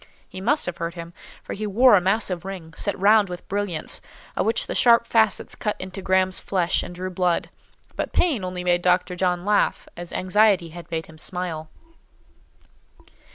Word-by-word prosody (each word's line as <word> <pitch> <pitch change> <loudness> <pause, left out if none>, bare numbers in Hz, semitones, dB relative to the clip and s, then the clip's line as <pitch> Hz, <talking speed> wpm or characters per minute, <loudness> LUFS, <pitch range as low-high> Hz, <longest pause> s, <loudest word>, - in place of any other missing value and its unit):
He 185 - -9
must 290 +10 +2
have 175 -1 -4
hurt 170 +1 -4
him; 170 0 -8 0.3
for - - -6
he 215 +1 -4
wore 240 +5 +5
a 195 - +6
massive 190 -2 0
ring, 185 -4 -8
set 200 - -3
round 205 +1 +4
with 180 0 -8
brilliants, 195 -5 -3 0.3
of - - 0
which 225 - +2
the - - -4
sharp 235 -1 +5
facets 220 -3 +1
cut 210 - -2
into 185 +1 -7
Graham's 185 0 +2
flesh 180 -3 0
and 175 - -8
drew 185 +1 -5
blood: 180 -1 0 0.4
but - - -3
pain 290 - +1
only 180 -1 -4
made 175 0 +2
Dr. 180 0 +2
John 180 0 0
laugh, 210 0 +1
as 175 0 -8
anxiety 190 -2 +2
had 170 +1 -11
made 160 -1 -3
him 155 -1 -15
smile. 165 -3 -4
185 Hz, 180 wpm, -23 LUFS, 175-205 Hz, 0.4 s, a